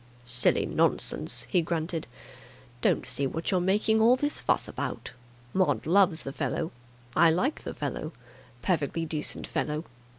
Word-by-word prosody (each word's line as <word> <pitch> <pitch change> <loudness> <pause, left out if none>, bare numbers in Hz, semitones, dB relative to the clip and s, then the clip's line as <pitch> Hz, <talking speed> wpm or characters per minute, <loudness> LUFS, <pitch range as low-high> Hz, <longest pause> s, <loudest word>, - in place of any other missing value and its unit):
"Silly 125 0 +2
nonsense!" - - +2
he 180 - +2
grunted. 165 -2 -2 0.7
"Don't - - +2
see 140 - 0
what 165 +7 -3
you're 185 - +3
making 210 +4 +2
all 235 +3 +6
this 290 +3 -1
fuss - - +1
about. - - -5 0.4
Maud 185 -1 +1
loves 180 -1 +3
the 135 - -5
fellow. 165 +3 -2 0.4
I 165 +1 +6
like 215 - 0
the - - -6
fellow. - - -4 0.5
Perfectly 165 -2 0
decent 155 -1 -3
fellow. 150 +1 -2
170 Hz, 140 wpm, -28 LUFS, 155-195 Hz, 0.7 s, all